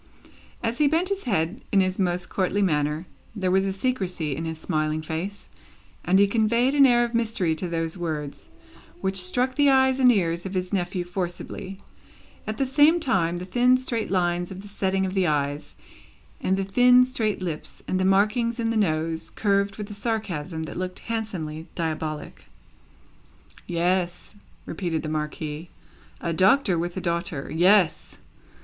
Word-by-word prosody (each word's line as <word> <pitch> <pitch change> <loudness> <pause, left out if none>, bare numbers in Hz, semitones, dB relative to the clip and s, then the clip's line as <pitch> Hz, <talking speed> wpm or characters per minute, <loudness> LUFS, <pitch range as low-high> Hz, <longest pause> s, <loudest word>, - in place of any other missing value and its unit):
As 235 +1 -1
he 300 - +5
bent 330 +5 +2
his 395 0 -3
head 190 -3 -1
in 200 - +4
his 185 0 +1
most 180 -1 0
courtly 195 +1 0
manner, 150 -1 0 0.3
there 185 -3 0
was 190 +1 +3
a - - 0
secrecy 190 - -2
in 165 - -4
his 160 -1 -4
smiling 155 0 -1
face, 170 +6 -5 0.6
and 185 +2 +3
he 200 - +6
conveyed 235 +5 +2
an 280 -2 +7
air 240 -1 +4
of 240 0 -3
mystery 220 -7 0
to 180 - -3
those 165 +1 -3
words, 150 -4 -5 0.5
which 190 -1 0
struck 245 +8 0
the 285 +1 +4
eyes 265 -1 +4
and 250 -1 +7
ears 170 -5 0
of 190 0 -6
his 185 +2 -2
nephew 180 -1 -1
forcibly. 180 +2 -5 0.6
At 215 0 -3
the 270 - +1
same 295 +6 +4
time, 175 - +1
the 180 - -6
thin 245 +6 +3
straight 235 -3 -3
lines 175 -1 0
of 190 0 -8
the - - -10
setting 190 -1 -1
of 185 - -3
the 190 -2 +2
eyes, 145 -1 -2 0.7
and 190 +1 +1
the 195 - 0
thin 245 +5 +5
straight 225 -5 -1
lips, 170 -5 -5
and 185 - 0
the - - +1
markings 215 +5 +2
in 225 -1 0
the 225 - 0
nose, 160 -4 0
curved 200 -1 0
with 210 -1 -5
a - - -5
sarcasm 195 -7 -3
that 160 - -7
looked 185 0 -4
handsomely 170 -9 -4
diabolic. 155 -2 -4 1.2
"Yes," 175 +1 -1 0.3
repeated 165 -5 -3
the 155 - -3
Marquis. 155 +1 -4 0.5
"A 170 - -1
Doctor 190 - +3
with 175 +2 -3
a - - -2
daughter. 170 -5 -2
Yes. 180 +1 +3
190 Hz, 170 wpm, -25 LUFS, 165-225 Hz, 1.2 s, an